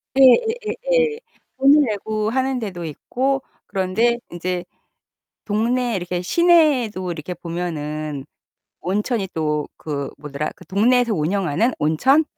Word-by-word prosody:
예예예예. 455 - +3 0.4
돈을 285 +2 +6
내고 215 +1 -2
하는 260 +1 0
데도 185 -6 -5
있고 260 - -1 0.2
그런데 210 +6 +1
인제 175 +1 -3 0.8
동네 235 +2 0
이렇게 180 -1 -3
시내에도 265 - +3
이렇게 170 +2 -6
보면은 155 -4 -4 0.6
온천이 205 +2 -1
또 150 -2 0
그 140 -3 -4
뭐더라. 150 +1 -4
그 - - -15
동네에서 235 +4 +3
운영하는 190 - +1
온천? 260 - +3
205 Hz, 255 characters per minute, -21 LUFS, 170-260 Hz, 0.8 s, 돈을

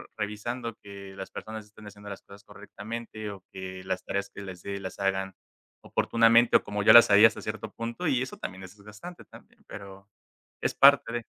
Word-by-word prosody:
revisando 115 +3 -4
que 100 -1 -11
las 95 - -7
personas 110 -1 -8
estén 105 0 -15
haciendo 100 0 -11
las 100 - -8
cosas 100 0 -16
correctamente, 110 +1 -8
o 95 -2 -11
que 95 0 -8
las 95 0 -3
tareas 100 0 -3
que 100 - -8
les 90 -2 -9
dé, 100 0 -5
las 95 -1 -7
hagan 95 0 -1 0.5
oportunamente, 115 +1 +3
o - - +5
como 105 0 -3
yo - - +8
las 120 -2 +9
haría, 105 +2 +9
hasta 115 - -7
cierto 110 0 -5
punto. 115 +9 -4
Y 130 -4 +1
eso 130 - -5
también 95 +1 -7
es 95 +2 -12
desgastante 105 - -12
también, - - -18
pero, 100 0 -11 0.5
es - - -1
parte 140 -4 +6
de 120 -1 -3
105 Hz, 195 wpm, -27 LUFS, 100-115 Hz, 0.5 s, las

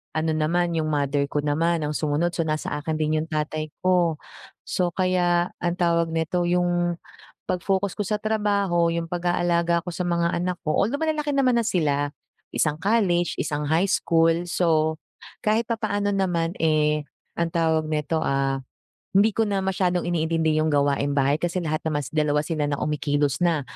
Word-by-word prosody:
ano 160 0 0
naman 170 +3 +1
yung 160 -1 0
mother 145 -1 0
ko 145 0 -1
naman 160 +3 +1
ang 150 - -2
sumunod 155 +3 0
so, 170 - -1
nasa 155 0 -2
akin 155 +1 -2
din 155 0 +1
yung 160 - -5
tatay 155 0 -2 0.2
ko. 180 -3 +3 0.5
So, 180 -1 0
kaya 180 -2 +1
ang 175 0 -1
tawag 170 -2 +2
nito, 165 +2 -1
yung 175 0 +1 0.5
pag-focus 190 +2 -1
ko - - -2
sa 210 +2 -1
trabaho, 200 -5 +1
yung 165 0 -2
pag-aalaga 175 -1 +1
ko 175 - -4
sa 180 - -2
mga 170 -1 0
anak 180 +1 -2
ko, 155 - +1
although 235 +8 +1
malalaki 310 -2 0
naman 270 -3 +2
na 235 - +2
sila 145 -8 0 0.4
isang 150 -1 +1
college, 180 -2 +1
isang 150 -1 -2
high 160 +6 +2
school, 165 -1 +2
so 160 -3 +1 0.5
kahit 220 +2 +3
papaano 210 -3 -1
naman, 175 -4 0
eh, 150 -2 +2 0.3
ang 170 0 +1
tawag 160 -2 +2
neto, 155 +1 -1
ah, 135 -2 0 0.5
hindi 205 +3 +5
ko 225 +1 +1
na 200 -1 0
masyadong 185 -2 0
iniintindi 160 -2 +1
yung 155 - +1
gawaing 140 0 +1
bahay 140 +2 +2
kasi 175 +1 -2
lahat 155 -1 -1
naman 145 -2 -1
2 150 -1 +1
sila 155 -2 -1
na 145 - 0
kumikilos 145 -2 0
na. 170 -4 +2
170 Hz, 170 wpm, -24 LUFS, 155-180 Hz, 0.5 s, hindi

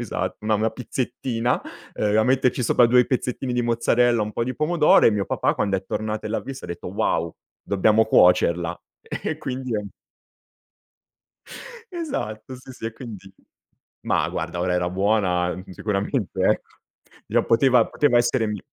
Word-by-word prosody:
esatto, - - -3
una 110 0 +1
una 110 +1 +1
pizzettina, 125 -1 -2 0.3
ehm, 105 0 +1
a - - +5
metterci 130 -1 +2
sopra 120 +1 +4
2 125 +1 +5
pezzettini 125 0 -2
di 120 - 0
mozzarella, 120 0 +2
un 105 0 -4
po' 115 - -1
di 130 +1 -3
pomodoro, 155 0 +4
e - - +6
mio 105 -2 -1
papà - - 0
quando 100 -2 0
è 95 - -6
tornato 110 +1 -3
e - - -4
l'ha 110 - -1
visto 135 -1 -8
ha - - -13
detto: 85 - -7
"Wow, - - -1 0.3
dobbiamo 105 +3 +3
cuocerla." 90 -4 +3 0.4
E - - -2
quindi 130 -2 -4
è 105 - +1
un 105 - -6 2.1
Esatto, 130 - -5
sì 130 +1 -12
sì, 125 - -9
e 115 - -4
quindi 105 -6 -10 0.7
Ma - - 0
guarda, 85 +3 -4
ora 90 0 0
era 90 0 0
buona, 95 -2 +1
mhmm, 95 +1 -10
sicuramente, 100 +1 -2
ecco. - - 0 0.5
Gli - - -6
a - - +4
poteva 120 0 +4
poteva 145 -5 +2
essere 120 -1 +1
mi 105 0 -3
110 Hz, 170 wpm, -23 LUFS, 100-125 Hz, 2.1 s, e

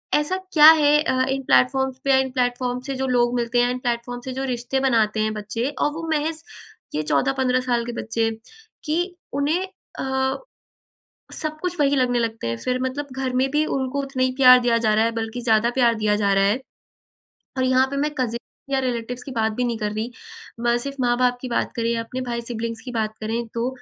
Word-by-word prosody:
ऐसा 300 +6 +1 0.2
क्या 305 -1 +10
है 300 -2 +4
अ, 260 -4 +1
इन 270 0 -1
प्लेटफॉर्म्स 265 +1 +2
पे 275 - -2
या 265 - +6
इन 265 0 +1
प्लेटफॉर्म्स 250 0 -1
से 275 - -3
जो 265 0 -2
लोग 245 -1 +2
मिलते 240 0 0
हैं, 245 - +2
इन 250 - -3
प्लेटफॉर्म 245 0 -3
से 260 - -4
जो 265 +1 -3
रिश्ते 245 +2 -2
बनाते 225 -5 +2
हैं 215 0 0
बच्चे 215 +4 -3
और 295 - +2
वो 330 +1 -6
महज़ 315 +1 -1 0.5
ये 155 - +1
14-15 260 - +1
साल 235 -1 +1
के 240 - -4
बच्चे 225 0 0 0.6
कि 305 +1 0 0.4
उन्हें 320 +6 +1 0.4
अ, 265 0 0 1.0
सब 310 0 -5
कुछ 360 -1 -3
वही 285 0 +3
लगने 250 -2 +2
लगते 225 - -3
हैं 115 - -2
फिर 255 0 0
मतलब 265 +3 -3
घर 265 -1 -2
में 260 +1 +2
भी 300 +2 +2
उनको 265 +1 -2
उतना 270 -1 -3
ही 255 - +1
प्यार 255 -1 +9
दिया 240 -1 +2
जा 220 -2 +2
रहा 220 +1 +3
है 230 - +2
बल्कि 225 +2 -4
ज़्यादा 225 0 +3
प्यार 235 -1 +4
दिया 210 -1 +1
जा 200 -1 +1
रहा 195 0 +3
है। 205 +6 +2 1.0
और 260 - +1
यहाँ 255 +1 +3
पर 280 - -2
मैं 295 +2 0
कज़िन 235 -2 -1 0.3
या 265 - +3
रिलेटिवज़ 245 -1 -3
की 275 - -7
बात 220 -2 0
भी - - +2
नहीं 235 -1 -1
कर 210 -1 -2
रही। 225 +3 -3 0.5
म 235 0 +2
सिर्फ़ 275 +3 -5
माँ-बाप 245 0 +2
की 255 - -5
बात 235 - -1
करें 230 -1 0
या 230 -1 0
अपने 250 +3 -6
भाई 240 -2 -3
सिबलिंग्स 230 -1 -5
की 250 - -5
बात 220 -1 -1
करें 225 +2 -2
तो 235 +2 0
250 Hz, 220 wpm, -23 LUFS, 230-265 Hz, 1.0 s, क्या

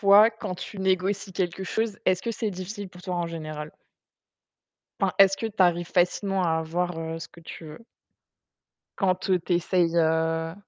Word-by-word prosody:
toi, 205 +2 +7
quand 220 -4 -5
tu 195 +2 -8
négocies 190 +1 0
quelque 180 0 -2
chose, 220 +1 -2
est-ce 185 -1 +3
que 235 - -2
c'est 225 -1 -2
difficile 195 +2 -6
pour 180 0 -14
toi 180 -2 -3
en 175 -1 -1
général? 155 -2 -6 1.3
Enfin, 190 - +3
est-ce 195 0 +7
que 225 - -2
tu 215 - -7
arrives 175 -1 +3
facilement 190 +2 +1
à 160 -2 +2
avoir 175 +2 -1 0.3
ce - - -6
que 170 - -17
tu 165 - -10
veux 155 +8 -11 1.1
quand, 185 -1 +1
heu, 185 - +4
tu 180 - +1
essayes, 170 -1 +1
heu, 165 0 +1
180 Hz, 175 wpm, -26 LUFS, 170-195 Hz, 1.3 s, toi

